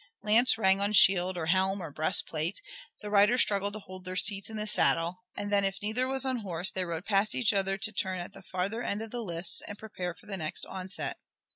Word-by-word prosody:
Lance 225 +4 +4
rang 195 -2 +3
on 205 +1 0
shield 185 -2 +6
or 165 - -3
helm 190 +3 +1
or 165 -5 -7
breastplate, 155 +3 0 0.4
the 210 -1 -7
riders 210 +4 +4
struggled 200 -1 -1
to 215 - -6
hold 185 -1 -12
their 185 0 -5
seats 200 +1 +2
in 220 - -7
the 210 - -1
saddle, 175 -4 +2 0.2
and 205 0 -4
then 200 -1 +2
if 195 0 -2
neither 220 +5 0
was 270 0 -1
unhorsed 200 -8 -2
they 185 -1 -1
rode 170 +1 -5
past 205 0 +1
each 225 -4 +2
other 195 -1 0
to 215 +2 -1
turn 190 -2 -2
at 175 +2 -7
the 195 - -12
farther 190 +5 -3
end 210 -2 -3
of 225 - -10
the 245 - -4
lists, 175 -4 0
and 205 - -8
prepare 180 -5 -6
for 175 - -20
the 200 -2 -6
next 155 -3 -4
onset. 190 0 -4
195 Hz, 230 wpm, -29 LUFS, 185-210 Hz, 0.4 s, shield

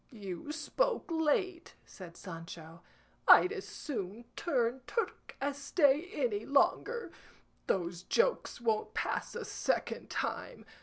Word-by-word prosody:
"You 200 - -6
spoke 395 +7 0
late," 330 +2 0
said 175 -3 -11
Sancho. 165 -2 -9 0.5
"I'd 365 - +9
as 410 -2 -5
soon 225 -4 -5
turn 255 -5 0
Turk 460 - -3
as 285 0 -2
stay 290 +3 +3
any 420 -5 0
longer. 460 +11 +2 0.6
Those 175 -2 0
jokes 470 - +1
won't 225 -2 0
pass - - -1
a - - -4
second - - -1
time. - - -3
280 Hz, 115 wpm, -33 LUFS, -, 0.6 s, I'd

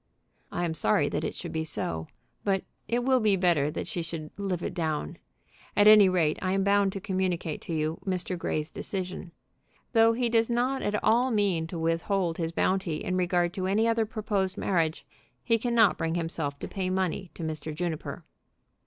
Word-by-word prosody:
"I 175 - -1
am 165 - -1
sorry 105 -9 +2
that - - -2
it - - -3
should - - -6
be 160 0 -1
so. 80 - -3 0.4
But 195 -2 +1 0.2
it 240 +3 0
will 260 0 +4
be 215 -3 +3
better 170 -6 +2
that - - -4
she 175 - -3
should 160 -2 -6
live 190 -4 -3
it - - -3
down. 155 - -2 0.6
At 205 0 +6
any 210 -3 +9
rate, 165 -4 +1
I 185 0 0
am 195 0 +1
bound 200 0 +3
to 195 - -4
communicate 185 -5 -2
to 170 - -5
you 155 +1 -1
Mr. 185 -1 -2
Grey's 155 -2 -2
decision. 185 -2 -5 0.6
Though 225 0 +5
he 245 +1 0
does 230 0 +2
not 250 +3 +1
at 210 0 -1
all 240 +4 +4
mean 200 -8 +1
to 170 - -6
withhold 165 +2 0
his 165 -1 -1
bounty 180 -2 0
in 185 - -1
regard 175 -1 +1
to 185 -1 -2
any 215 +4 +2
other 225 -1 +1
proposed 205 -4 -1
marriage, 165 -4 0 0.4
he 230 -2 +2
cannot 235 -2 +3
bring 165 0 -1
himself 160 -4 -2
to - - -6
pay 190 -2 -3
money 185 0 -1
to - - -6
Mr. 155 -1 -4
Juniper." 160 0 -4
185 Hz, 190 wpm, -28 LUFS, 165-205 Hz, 0.6 s, any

